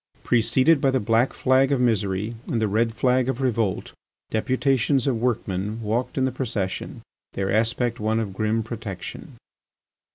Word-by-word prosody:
Preceded 130 +6 +3
by 135 - +3
the 130 0 +1
black 115 +4 +2
flag 130 +1 +2
of 140 - +2
misery 105 -3 0
and 115 - -1
the 110 - +1
red 115 +2 0
flag 125 +1 +2
of 130 - -2
revolt, 115 -7 -1 0.4
deputations 130 +2 +1
of 125 -5 0
workmen 105 -3 -1
walked 115 +4 -2
in 130 - +2
the 130 - 0
procession, 105 -8 -4 0.3
their 95 0 -2
aspect 115 +2 0
one 110 +1 0
of 105 -4 -3
grim 110 +3 0
protection. 110 -5 -7
115 Hz, 155 wpm, -24 LUFS, 110-130 Hz, 0.4 s, Preceded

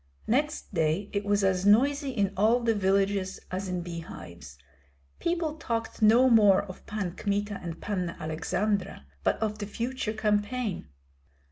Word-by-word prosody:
Next 290 +1 -1
day 165 +4 0
it 200 0 -1
was 205 0 +2
as 190 -1 +2
noisy 275 +8 +4
in 200 -6 0
all 225 +5 +3
the 230 -1 +2
villages 195 -1 +1
as 190 +1 -3
in 180 -1 -2
bee 170 -1 -5
hives. 85 - -10 0.6
People 335 -3 -1
talked 230 -6 -3
no 230 +4 +6
more 210 -5 +6
of 185 -2 -11
Pan 205 -4 -3
Kmita 205 0 -2
and 170 -2 -6
Panna 185 -5 -3
Aleksandra, 165 - -2 0.2
but - - +2
of 215 -1 -2
the 205 - -4
future 230 +1 -3
campaign. 210 - -1
205 Hz, 150 wpm, -28 LUFS, 185-230 Hz, 0.6 s, no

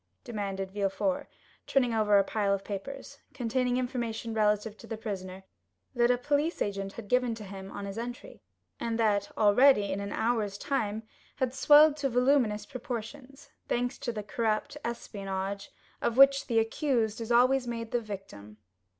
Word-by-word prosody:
demanded 195 -4 -4
Villefort, 205 +9 -1 0.4
turning 250 -4 +2
over 210 -2 +4
a 200 - +5
pile 200 -1 0
of 195 - -7
papers, 275 +8 -7 0.2
containing 250 +1 0
information 240 -3 -3
relative 210 0 +1
to - - -13
the 225 - -5
prisoner, 190 -3 -6 0.5
that 240 0 +3
a 250 - +4
police 290 +6 0
agent 195 -1 -2
had 225 -3 -9
given 250 0 +2
to 220 - -9
him 195 -1 -8
on 200 - -6
his 200 +2 -5
entry, 240 +1 -7 0.4
and 230 -1 -2
that, 210 -3 +1
already, 210 0 +5
in 190 - -2
an 200 0 -5
hour's 220 -4 0
time, 220 -4 -2 0.3
had 255 -1 -1
swelled 295 +2 +7
to 280 -2 0
voluminous 245 -4 +2
proportions, 255 +3 -7 0.2
thanks 245 +2 -1
to 240 - -2
the 215 -2 -5
corrupt 215 +3 -1
espionage 200 -4 -4 0.3
of 235 - 0
which 275 0 +6
"the 230 - 0
accused" 225 -1 +1
is 230 +1 -4
always 250 +2 +4
made 230 -1 -4
the 240 - +1
victim. 145 - -9
225 Hz, 160 wpm, -29 LUFS, 205-250 Hz, 0.5 s, swelled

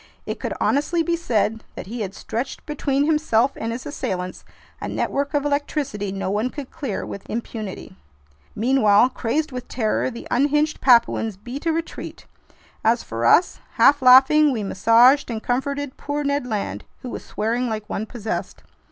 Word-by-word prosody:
It - - -4
could - - -3
honestly 325 +4 +1
be 340 +1 0
said 225 -8 0
that - - -7
he 230 +4 -6
had 195 -1 -4
stretched 240 +4 -5
between 285 -2 0
himself 285 -5 +2
and 225 - -4
his 235 +2 -6
assailants 185 -10 -4 0.4
a - - -3
network 280 +2 -2
of 290 0 +1
electricity 285 -7 -2
no 195 -1 -3
one 215 +5 0
could 280 -1 -8
clear 275 -11 -4
with 200 - -8
impunity. 220 -3 -6 0.6
Meanwhile, 235 -1 +4
crazed 270 +5 -2
with 250 -1 -6
terror, 225 +1 0
the 235 -2 -9
unhinged 295 +4 +1
Papuans 235 -4 +3
beat 245 - -7
a - - +4
retreat. 330 +1 -5 0.6
As 230 +2 +2
for 115 +1 -3
us, 355 - +4
half 285 0 +5
laughing, 270 +4 +7
we 225 -5 -2
massaged 230 +8 +4
and 225 -2 -4
comforted 280 +2 -2
poor 290 0 -3
Ned 280 -2 -1
Land, 215 -4 -3 0.2
who 250 - -5
was - - -6
swearing 235 +3 -1
like 215 -1 -4
one 215 - -4
possessed. 225 -2 -5
250 Hz, 165 wpm, -22 LUFS, 220-285 Hz, 0.6 s, laughing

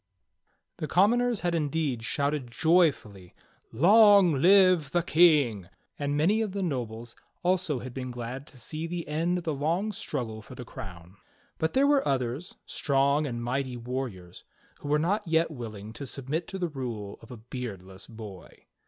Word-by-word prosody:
HE 155 - -3
commoners 235 +6 +3
had 175 -1 0
indeed 150 -5 -1
shouted 140 +2 -1
joyfully, 120 - +1 0.4
"Long 200 - +6
live 185 -4 +5
the 175 +3 +1
^ - - -23
J - - -9
King!" 145 - +4 0.3
and 145 0 -1
many 195 +9 +3
of 210 -4 -2
the 200 -1 -2
nobles 120 -7 -4 0.3
also 175 -7 +1
had 130 -1 -8
been 130 -1 -5
glad 125 +3 -6
to 135 - -16
see 155 +7 -4
the 170 0 -5
end 165 +4 0
of 175 - -5
the 160 -3 -1
long 165 +9 -1
struggle 120 - -4
for 125 - -12
the 125 - -8
crown; 90 -3 -10 0.4
but 160 0 0
there 270 +1 +4
were 285 -1 +3
others, 130 +5 -2
strong 140 +1 +1
and 120 -2 -4
mighty 130 +1 -2
warriors, 120 -8 -6 0.4
who - - -8
were 150 +1 +3
not 180 +6 0
yet 165 0 +2
willing 110 -5 -8
to 140 +4 -7
submit 140 +6 -3
to 195 - -6
the 180 -2 -1
rule 120 -8 -6
of - - -15
a 125 - -8
"beardless 105 -5 -8
boy." 105 -5 -11
140 Hz, 170 wpm, -28 LUFS, 120-170 Hz, 0.4 s, Long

